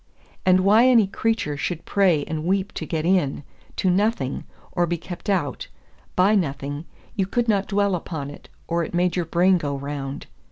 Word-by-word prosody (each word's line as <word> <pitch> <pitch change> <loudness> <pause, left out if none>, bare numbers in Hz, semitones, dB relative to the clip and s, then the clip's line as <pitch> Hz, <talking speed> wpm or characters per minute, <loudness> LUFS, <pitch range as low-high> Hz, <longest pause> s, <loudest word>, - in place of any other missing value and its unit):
And 185 0 +6
why 215 +6 +6
any 235 -5 +6
creature 200 -6 -1
should 165 +3 -3
pray 180 -7 +3
and 155 0 -4
weep 190 +3 0
to - - -5
get 160 -1 -2
in 170 -6 +1 0.3
to 185 - +2
nothing, 190 - 0 0.3
or 175 -2 +1
be 175 +1 -1
kept 175 +3 -8
out 175 -8 -1 0.5
by 190 +4 +4
nothing, 145 -4 -1 0.3
you 195 -2 0
could 240 +3 0
not 200 -3 +2
dwell 200 -1 +1
upon 160 -5 -4
it, - - -14 0.2
or 170 0 0
it 170 - -5
made 180 0 +2
your 175 -2 0
brain 180 +3 +3
go 145 -3 -2
round. 140 -1 -5
175 Hz, 185 wpm, -23 LUFS, 150-195 Hz, 0.5 s, And